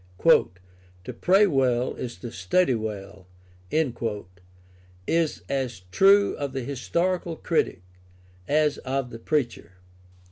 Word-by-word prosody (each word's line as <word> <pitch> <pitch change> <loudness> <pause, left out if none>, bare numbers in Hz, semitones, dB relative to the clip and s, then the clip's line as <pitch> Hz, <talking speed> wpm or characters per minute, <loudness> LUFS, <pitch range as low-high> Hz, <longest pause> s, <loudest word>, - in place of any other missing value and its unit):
"To 90 0 0
pray 195 +3 +4
well 130 -7 +1
is 120 -1 -6
to 120 - -6
study 125 - +1
well" 105 -4 -6 1.8
is 165 -2 0
as 130 -6 -2
true 200 - +5
of 140 -2 -4
the 135 -2 -3
historical 170 +6 -1
critic 155 - -1 0.6
as 150 0 +2
of 130 -1 -3
the 115 - -8
preacher. 120 - -2
130 Hz, 105 wpm, -25 LUFS, 110-160 Hz, 1.8 s, true